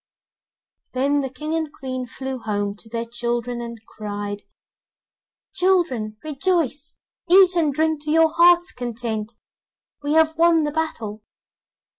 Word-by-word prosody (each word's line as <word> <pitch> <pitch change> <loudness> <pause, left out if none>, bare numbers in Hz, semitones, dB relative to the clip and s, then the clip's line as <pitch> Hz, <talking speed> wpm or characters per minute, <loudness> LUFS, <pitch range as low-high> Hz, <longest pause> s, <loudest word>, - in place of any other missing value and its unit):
Then 280 +3 +2
the 265 - -3
King 305 +4 -5
and 320 -2 -1
Queen 255 -3 -5
flew 265 +1 -5
home 205 -2 -2
to 225 - -15
their 230 +1 -3
children 240 0 -2
and 235 -1 -7
cried: 205 -1 -5 1.1
'Children, 345 - +1
rejoice, 305 -2 -1 0.3
eat 370 0 +7
and 320 -4 +2
drink 315 +1 0
to 300 - -1
your 320 0 +5
heart's 345 +1 +5
content, 230 -2 -4 0.7
we 290 +1 -1
have 320 0 +4
won 335 -1 +5
the 295 - -1
battle! 230 -10 -3
270 Hz, 130 wpm, -22 LUFS, 235-320 Hz, 1.1 s, eat